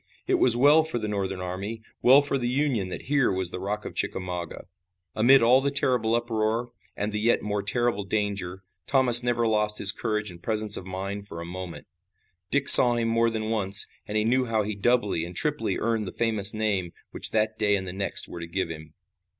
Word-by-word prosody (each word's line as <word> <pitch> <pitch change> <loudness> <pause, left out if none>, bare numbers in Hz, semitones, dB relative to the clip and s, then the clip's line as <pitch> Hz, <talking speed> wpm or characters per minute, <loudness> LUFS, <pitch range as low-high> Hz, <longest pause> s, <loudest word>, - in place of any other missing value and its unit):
It - - 0
was 120 -2 +6
well 145 +5 +5
for 160 -5 -4
the 110 -2 -4
Northern 95 -2 -4
army, 100 +5 -6 0.2
well 135 +3 +5
for 140 -1 -2
the 120 - -3
Union 125 -8 -1
that - - -8
here 145 -2 0
was 95 -2 +1
the - - -6
Rock 105 +3 -5
of - - -7
Chickamauga. 90 -2 -5 0.5
Amid 125 +4 +4
all 125 +3 +4
the 140 - -1
terrible 125 -5 +1
uproar 115 0 -2 0.3
and 105 +1 -3
the 105 - -4
yet 115 +2 0
more 105 -1 -3
terrible 110 +1 -1
danger, 100 -2 -4 0.2
Thomas 125 -3 +6
never 120 -1 -1
lost 105 -1 0
his 95 - +4
courage 105 -2 -4
and 85 -1 -15
presence 110 -1 0
of 95 - -8
mind 100 +2 -6
for 85 - -9
a 85 - -7
moment. 90 0 -9 0.6
Dick 140 -1 -1
saw 120 -1 +10
him 115 -1 -2
more 115 0 +1
than 110 -1 -4
once, 100 -2 +3 0.2
and 105 - -3
he 105 - +1
knew 125 +3 0
how 110 -2 -1
he 105 +1 -4
doubly 105 -4 -1
and 85 +1 -9
triply - - -3
earned 110 -2 -2
the - - -6
famous 110 -3 +1
name 100 -5 -3 0.2
which - - +3
that 110 -1 -2
day 105 -1 +1
and 95 -1 -5
the 90 - -7
next 100 +1 -3
were 85 - -9
to 85 - -8
give 95 0 -4
him. 80 -1 -11
105 Hz, 215 wpm, -25 LUFS, 95-120 Hz, 0.6 s, saw